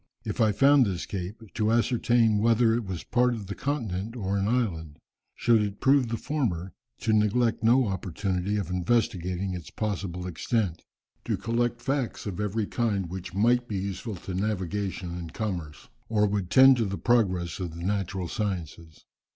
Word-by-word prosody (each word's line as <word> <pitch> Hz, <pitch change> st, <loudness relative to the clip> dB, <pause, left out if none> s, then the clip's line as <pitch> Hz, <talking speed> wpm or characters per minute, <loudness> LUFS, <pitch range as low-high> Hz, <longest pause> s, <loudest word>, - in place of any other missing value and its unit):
If -, -, -2 dB
I 110 Hz, -1 st, +4 dB
found 135 Hz, +3 st, +5 dB
this 90 Hz, -3 st, -3 dB
cape, 100 Hz, +4 st, -6 dB
to 110 Hz, 0 st, +1 dB
ascertain 120 Hz, -2 st, +3 dB
whether 115 Hz, +1 st, +4 dB
it 115 Hz, -1 st, -1 dB
was 95 Hz, -3 st, -5 dB
part 125 Hz, 0 st, +2 dB
of 105 Hz, -3 st, -7 dB
the 100 Hz, -, -5 dB
continent 115 Hz, -6 st, -3 dB
or 100 Hz, -4 st, -2 dB
an 100 Hz, 0 st, 0 dB
island. 90 Hz, -11 st, -1 dB, 0.4 s
Should 115 Hz, -2 st, +3 dB
it 100 Hz, -1 st, -3 dB
prove 135 Hz, -2 st, +4 dB
the 115 Hz, 0 st, -2 dB
former, 95 Hz, -, -2 dB, 0.3 s
to 110 Hz, -, +1 dB
neglect 110 Hz, +2 st, +2 dB
no 120 Hz, +3 st, +5 dB
opportunity 95 Hz, +1 st, -2 dB
of 95 Hz, -4 st, -3 dB
investigating 90 Hz, -1 st, 0 dB
its 90 Hz, -3 st, -7 dB
possible 95 Hz, -4 st, -3 dB
extent. 90 Hz, +1 st, -1 dB, 0.4 s
To -, -, 0 dB
collect 120 Hz, +1 st, -1 dB
facts 135 Hz, -4 st, -2 dB
of 100 Hz, -2 st, -4 dB
every 105 Hz, +1 st, -1 dB
kind 100 Hz, -7 st, -1 dB
which 95 Hz, 0 st, -6 dB
might 120 Hz, +4 st, +3 dB
be 105 Hz, -, -3 dB
useful 100 Hz, +2 st, -4 dB
to 95 Hz, +1 st, -7 dB
navigation 95 Hz, -2 st, -2 dB
and 85 Hz, -2 st, -7 dB
commerce, 85 Hz, -, -4 dB, 0.2 s
or 105 Hz, -2 st, +3 dB
would 100 Hz, -3 st, -1 dB
tend 130 Hz, +4 st, +7 dB
to 115 Hz, -, +1 dB
the 100 Hz, 0 st, -3 dB
progress 95 Hz, -9 st, +1 dB
of 85 Hz, -3 st, -4 dB
the 85 Hz, -, -7 dB
natural 95 Hz, -2 st, -2 dB
sciences. 85 Hz, -6 st, -5 dB
105 Hz, 170 wpm, -27 LUFS, 90-115 Hz, 0.4 s, tend